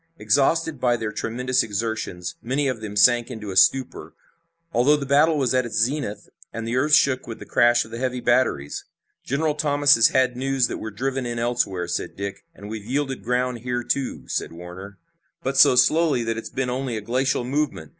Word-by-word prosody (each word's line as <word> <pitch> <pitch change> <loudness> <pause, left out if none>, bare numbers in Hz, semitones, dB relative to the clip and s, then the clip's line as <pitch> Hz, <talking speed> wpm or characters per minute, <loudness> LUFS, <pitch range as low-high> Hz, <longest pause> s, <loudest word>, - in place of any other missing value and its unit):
Exhausted 160 +1 +1
by 120 -1 +2
their 110 -1 -4
tremendous 125 +4 -1
exertions, 105 -5 -4
many 135 +4 -1
of 125 -4 -3
them 105 -1 -6
sank 120 +4 +4
into 110 -5 -7
a - - -6
stupor, 130 +8 +2 0.6
although 130 +5 +4
the 140 - -5
battle 150 +3 +3
was 130 -4 +1
at 130 0 +2
its 120 - -5
zenith 120 -1 -1 0.2
and 115 0 -5
the 120 - -2
earth 150 +4 +4
shook 130 -3 +2
with 115 - -6
the - - -11
crash 120 0 +3
of 110 - -15
the 115 - -6
heavy 125 -1 -2
batteries. 120 - 0 0.4
"General 150 +3 0
Thomas 145 -1 +3
has 115 - +6
had 130 -1 +1
news 135 0 +1
that - - -5
we're 110 - -5
driven 130 +4 -3
in 120 0 -4
elsewhere," 115 -7 -1
said 85 - -4
Dick. 100 0 -6
"And 100 - -11
we've 110 -1 -6
yielded 135 +3 -2
ground 125 0 -1
here, 120 +1 -3
too," 135 +1 -3
said - - -3
Warner. 90 +4 -10 0.5
"But 135 +1 -2
so - - +7
slowly 145 0 +3
that 115 0 -2
it's 115 - -6
been 130 -1 -2
only 125 -2 -3
a - - -5
glacial 125 +3 0
movement. 130 - -2
125 Hz, 200 wpm, -23 LUFS, 110-135 Hz, 0.6 s, so